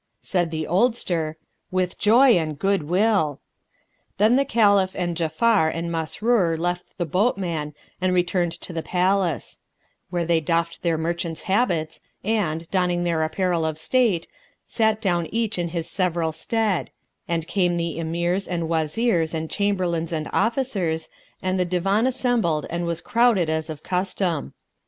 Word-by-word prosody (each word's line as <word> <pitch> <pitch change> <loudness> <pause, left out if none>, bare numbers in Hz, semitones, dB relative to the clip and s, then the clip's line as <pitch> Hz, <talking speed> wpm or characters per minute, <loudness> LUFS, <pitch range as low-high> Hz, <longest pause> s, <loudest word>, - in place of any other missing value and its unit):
Said 175 -3 0
the 160 -1 -3
oldster, 175 -6 0 0.3
"With 185 -1 -1
joy 245 +5 +6
and 160 -7 +1
good 195 +3 +1
will!" 180 -2 +1 0.8
Then 215 +5 +4
the 275 +1 +3
Caliph 200 -6 +3
and 175 -2 -2
Ja'afar 165 +3 +2
and 170 +1 -3
Masrur 170 +2 +1
left 175 +2 -3
the 175 - -1
boatman 170 - -1 0.3
and 185 0 +2
returned 180 -1 +1
to 180 - -8
the 165 - -2
palace; 180 -1 0 0.5
where 175 -1 -1
they 165 0 +3
doffed 165 +1 -1
their 165 -2 +1
merchants' 165 0 -3
habits 175 -7 0 0.2
and, 175 -7 -1
donning 180 -2 +1
their 170 -2 0
apparel 170 +1 0
of 160 -1 -2
state, 205 -1 +1 0.4
sat 220 -2 +1
down 175 -5 0
each 220 -1 -2
in 175 - 0
his 165 -1 -4
several 175 -4 0
stead; 215 +3 -1 0.4
and 165 -2 -1
came 175 0 +1
the 170 -1 -2
Emirs 170 +4 -1
and 175 -2 -2
Wazirs 165 +2 0
and 160 0 -4
Chamberlains 180 -5 0
and 155 -2 -2
Officers, 210 -10 0 0.3
and 185 0 0
the - - +3
Divan 195 +6 +1
assembled 240 - +1
and 170 0 -2
was 170 -1 -2
crowded 230 -9 +3
as 160 0 -2
of 155 -2 -7
custom. 180 -4 -2
175 Hz, 150 wpm, -23 LUFS, 165-200 Hz, 0.8 s, joy